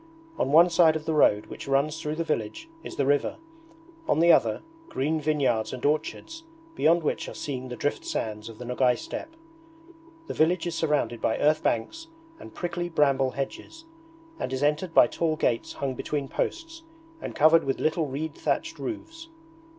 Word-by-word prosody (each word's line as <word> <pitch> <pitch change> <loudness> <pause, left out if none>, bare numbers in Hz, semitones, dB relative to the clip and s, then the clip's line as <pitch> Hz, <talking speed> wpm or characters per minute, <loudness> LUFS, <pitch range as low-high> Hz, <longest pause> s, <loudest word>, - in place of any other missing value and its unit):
On 135 - 0
one 165 +4 +8
side 165 -2 +5
of 155 -1 -4
the 160 - 0
road 105 -8 +4
which - - -9
runs 145 +4 +1
through 150 -1 -3
the 165 - -1
village 150 - -3 0.2
is - - -8
the 140 - 0
river; 145 +1 +1 0.7
on - - +2
the 170 +1 +6
other, - - +3 0.3
green 155 - -1
vineyards 130 -8 0
and 130 +1 -5
orchards, 160 - -2 0.3
beyond 170 - +3
which - - -2
are - - -9
seen 130 -3 -5
the 125 - -5
driftsands 110 -6 -3
of 110 - -11
the 125 - -8
Nogay 125 0 +2
Steppe. 325 - -7 0.9
The - - -5
village 170 +3 +2
is 175 - -2
surrounded 150 -7 0
by 110 - +1
earth 155 +1 +3
banks 325 - -2 0.3
and - - -11
prickly 175 0 -3
bramble 140 -4 +2
hedges, 235 - -6 0.5
and - - -3
is 130 +1 -2
entered 155 +4 0
by - - +8
tall 160 +1 -1
gates 120 -6 -1
hung 135 -2 -3
between 140 +2 -3
posts 330 - -4 0.4
and - - -6
covered 160 +2 +5
with 135 - -2
little 160 0 0
reed 145 +3 -4
thatched - - -2
roofs. 330 -1 -6
150 Hz, 175 wpm, -26 LUFS, 135-165 Hz, 0.9 s, one